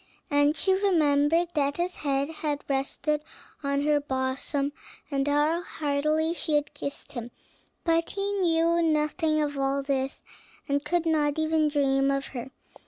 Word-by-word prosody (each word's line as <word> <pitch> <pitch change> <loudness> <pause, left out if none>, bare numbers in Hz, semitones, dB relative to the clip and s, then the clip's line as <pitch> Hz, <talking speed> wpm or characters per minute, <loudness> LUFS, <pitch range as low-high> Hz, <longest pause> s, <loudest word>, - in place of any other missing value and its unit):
And 290 +1 +3
she 380 - +3
remembered 330 -4 +3
that 285 -2 +1
his 355 +1 -2
head 275 -1 0
had 300 -2 -3
rested 280 +2 -1 0.4
on 280 -1 0
her 295 0 +3
bosom, 270 +1 -1 0.4
and 275 0 0
how 300 +4 +2
heartily 305 +1 0
she 320 -3 -1
had 295 0 0
kissed 280 -1 -6
him; 240 -2 -6 0.5
but 330 0 +2
he 400 0 -2
knew 335 -1 +3
nothing 310 0 +1
of 290 -2 -1
all 275 0 0
this, 270 0 -2 0.4
and 285 0 0
could 345 -1 0
not 300 -2 +1
even 315 0 +2
dream 275 -2 +2
of 275 0 -1
her. 250 +1 -6
295 Hz, 150 wpm, -27 LUFS, 280-320 Hz, 0.5 s, And